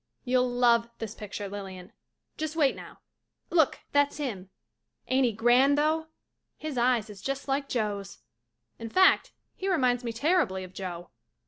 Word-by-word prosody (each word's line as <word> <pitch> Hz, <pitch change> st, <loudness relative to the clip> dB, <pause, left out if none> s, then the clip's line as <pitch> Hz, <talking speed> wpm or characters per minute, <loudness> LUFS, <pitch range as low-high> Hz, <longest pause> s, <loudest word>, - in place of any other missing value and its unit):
You'll 250 Hz, 0 st, +2 dB
love 240 Hz, -1 st, +3 dB
this 220 Hz, -2 st, -5 dB
picture, 205 Hz, -1 st, -6 dB
Lilian. 190 Hz, -2 st, -8 dB, 0.4 s
Just 315 Hz, 0 st, -4 dB
wait 290 Hz, -5 st, +3 dB
now -, -, -12 dB, 0.2 s
— -, -, -52 dB
look, 320 Hz, -5 st, +3 dB
that's 285 Hz, 0 st, +2 dB
him. 210 Hz, -11 st, -4 dB, 0.6 s
Ain't 260 Hz, 0 st, +3 dB
he -, -, 0 dB
grand 245 Hz, +6 st, +4 dB
though? 315 Hz, +2 st, +1 dB, 0.5 s
His 310 Hz, -3 st, -5 dB
eyes 240 Hz, -2 st, +2 dB
is 205 Hz, -3 st, -11 dB
just 275 Hz, +1 st, -4 dB
like 275 Hz, +1 st, -1 dB
Joe's. 205 Hz, -4 st, -2 dB, 0.6 s
In 230 Hz, 0 st, -6 dB
fact 375 Hz, -, +4 dB, 0.2 s
he 385 Hz, -, -3 dB
reminds 255 Hz, -8 st, +2 dB
me 235 Hz, -, -2 dB
terribly 245 Hz, -, +1 dB
of 185 Hz, 0 st, -11 dB
Joe. 175 Hz, -2 st, -6 dB
245 Hz, 155 wpm, -28 LUFS, 205-285 Hz, 0.6 s, grand